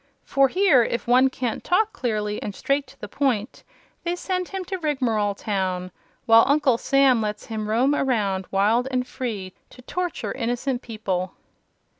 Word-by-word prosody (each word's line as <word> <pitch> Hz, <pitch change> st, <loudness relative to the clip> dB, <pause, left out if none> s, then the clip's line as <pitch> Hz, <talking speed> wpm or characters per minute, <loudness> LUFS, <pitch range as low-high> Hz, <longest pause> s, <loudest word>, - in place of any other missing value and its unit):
For 275 Hz, -1 st, +3 dB
here, 350 Hz, -5 st, +4 dB
if 235 Hz, +1 st, -2 dB
one 255 Hz, +2 st, +5 dB
can't 250 Hz, -3 st, -3 dB
talk 430 Hz, +5 st, +2 dB
clearly, 210 Hz, -4 st, -2 dB
and 205 Hz, -, -5 dB
straight 275 Hz, 0 st, 0 dB
to 270 Hz, +1 st, -18 dB
the -, -, -7 dB
point, 255 Hz, -5 st, -1 dB, 0.4 s
they 345 Hz, 0 st, -1 dB
send 365 Hz, 0 st, -2 dB
him 385 Hz, -1 st, -5 dB
to 380 Hz, +1 st, -4 dB
Rigmarole 235 Hz, -, 0 dB
Town; 185 Hz, -3 st, -2 dB, 0.3 s
while 230 Hz, -1 st, +7 dB
Uncle 280 Hz, -4 st, +3 dB
Sam 275 Hz, -4 st, +3 dB
lets 210 Hz, -1 st, -3 dB
him 215 Hz, -2 st, -4 dB
roam 250 Hz, +6 st, +3 dB
around 205 Hz, -9 st, 0 dB
wild 215 Hz, +6 st, +2 dB
and 255 Hz, -1 st, -1 dB
free, 215 Hz, -8 st, -5 dB, 0.2 s
to 250 Hz, -, -15 dB
torture 355 Hz, +5 st, -3 dB
innocent 245 Hz, +1 st, -2 dB
people." 190 Hz, -5 st, -3 dB
245 Hz, 160 wpm, -24 LUFS, 210-275 Hz, 0.4 s, while